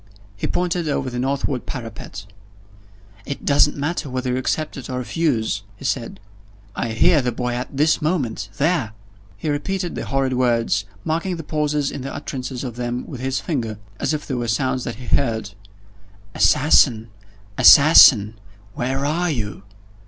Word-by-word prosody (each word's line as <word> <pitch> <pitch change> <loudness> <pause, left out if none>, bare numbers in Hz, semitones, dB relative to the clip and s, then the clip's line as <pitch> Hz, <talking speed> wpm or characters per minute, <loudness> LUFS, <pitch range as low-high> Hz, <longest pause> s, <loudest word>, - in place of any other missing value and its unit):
He 100 - -3
pointed 175 -2 -1
over 130 -3 -1
the 125 - -4
northward 135 0 -2
parapet. 115 -4 -7 1.0
"It 140 - -6
doesn't 145 +1 +3
matter 145 0 -2
whether 130 0 -2
you 125 - 0
accept 155 +4 -2
or 130 - -3
refuse," 120 -6 -1
he 135 - -11
said, 115 -6 -2 0.6
"I 120 - -2
hear 160 +6 +4
the 125 -1 -1
boy 125 +1 -3
at 125 +2 -5
this 155 +3 +3
moment 140 - -1
there!" 150 -8 0 0.4
He 160 - -6
repeated 175 +5 -2
the - - -5
horrid 135 -1 0
words 115 -5 +1 0.2
marking 170 +4 -1
the 165 - -7
pauses 150 -1 -1
in 140 - -6
the 135 +2 -5
utterance 130 -3 -5
of 120 -3 -6
them 120 0 -3
with 130 -5 -8
his 130 0 -1
finger, 115 - -3 0.2
as - - 0
if 150 -1 -3
they 135 - -4
were 120 -2 -2
sounds 130 +2 -1
that 120 - -4
he 125 +2 -11
heard: 110 -3 0 0.8
"Assassin! 125 -6 +4 0.5
Assassin! 115 -8 +8 0.3
where 135 +4 -2
are 170 +4 0
you?" 105 - -3
130 Hz, 160 wpm, -21 LUFS, 120-150 Hz, 1.0 s, Assassin